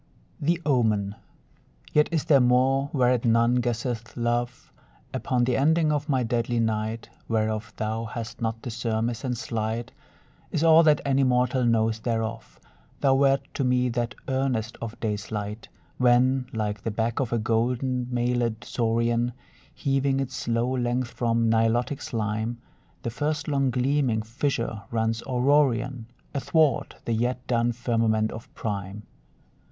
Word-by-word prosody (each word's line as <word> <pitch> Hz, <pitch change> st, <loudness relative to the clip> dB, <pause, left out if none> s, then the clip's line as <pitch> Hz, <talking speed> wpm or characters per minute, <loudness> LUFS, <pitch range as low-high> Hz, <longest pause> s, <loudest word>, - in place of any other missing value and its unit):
THE 170 Hz, +3 st, +1 dB
OMEN 110 Hz, -8 st, +2 dB, 0.8 s
Yet 150 Hz, 0 st, +4 dB
is 160 Hz, -3 st, 0 dB
there 140 Hz, -3 st, +5 dB
more, 130 Hz, +3 st, +3 dB
whereat 125 Hz, -3 st, +2 dB
none 115 Hz, +1 st, +3 dB
guesseth, 120 Hz, -1 st, -3 dB
love! 120 Hz, +1 st, -2 dB, 0.4 s
Upon 125 Hz, -1 st, 0 dB
the 125 Hz, 0 st, +1 dB
ending 155 Hz, +2 st, +3 dB
of 150 Hz, +1 st, -1 dB
my 130 Hz, -3 st, +2 dB
deadly 120 Hz, 0 st, 0 dB
night 110 Hz, 0 st, -1 dB, 0.2 s
(Whereof 110 Hz, -1 st, -1 dB
thou 110 Hz, +1 st, -2 dB
hast 115 Hz, +1 st, -6 dB
not 115 Hz, 0 st, -2 dB
the 120 Hz, -, -4 dB
surmise, 115 Hz, 0 st, -2 dB
and 125 Hz, -2 st, -2 dB
slight 110 Hz, 0 st, -3 dB, 0.6 s
Is 155 Hz, -, -1 dB
all 165 Hz, 0 st, +7 dB
that 155 Hz, -2 st, +4 dB
any 135 Hz, 0 st, +3 dB
mortal 125 Hz, 0 st, +2 dB
knows 110 Hz, -1 st, +2 dB
thereof), 115 Hz, -1 st, -3 dB, 0.4 s
Thou 135 Hz, -2 st, +4 dB
wert 135 Hz, 0 st, +4 dB
to 140 Hz, -, -1 dB
me 125 Hz, 0 st, +2 dB
that 120 Hz, 0 st, -2 dB
earnest 130 Hz, -4 st, -1 dB
of 115 Hz, 0 st, -6 dB
day's 105 Hz, -2 st, -3 dB
light, 105 Hz, +1 st, -5 dB, 0.3 s
When, 125 Hz, +1 st, +3 dB
like 105 Hz, -2 st, -2 dB
the 115 Hz, -, -2 dB
back 115 Hz, +2 st, -1 dB
of 130 Hz, -3 st, -1 dB
a 120 Hz, -, +1 dB
gold 115 Hz, +2 st, 0 dB
mailèd 125 Hz, -2 st, -1 dB
saurian 115 Hz, +1 st, 0 dB, 0.4 s
Heaving 135 Hz, -2 st, 0 dB
its 135 Hz, -2 st, -3 dB
slow 120 Hz, +2 st, 0 dB
length 125 Hz, -1 st, 0 dB
from 115 Hz, -1 st, +1 dB
Nilotic 115 Hz, +5 st, +1 dB
slime, 110 Hz, +1 st, -2 dB, 0.4 s
The 115 Hz, -, -2 dB
first 150 Hz, +4 st, -2 dB
long 140 Hz, -3 st, +1 dB
gleaming 125 Hz, -2 st, +1 dB
fissure 115 Hz, -2 st, -2 dB
runs 115 Hz, 0 st, 0 dB
Aurorian 130 Hz, -2 st, +2 dB, 0.3 s
Athwart 145 Hz, +1 st, +1 dB
the 115 Hz, -, 0 dB
yet 125 Hz, +3 st, -1 dB
dun 120 Hz, -1 st, +1 dB
firmament 115 Hz, -2 st, +1 dB
of 115 Hz, -, -9 dB
prime. 100 Hz, -1 st, -4 dB
120 Hz, 145 wpm, -26 LUFS, 115-130 Hz, 0.8 s, all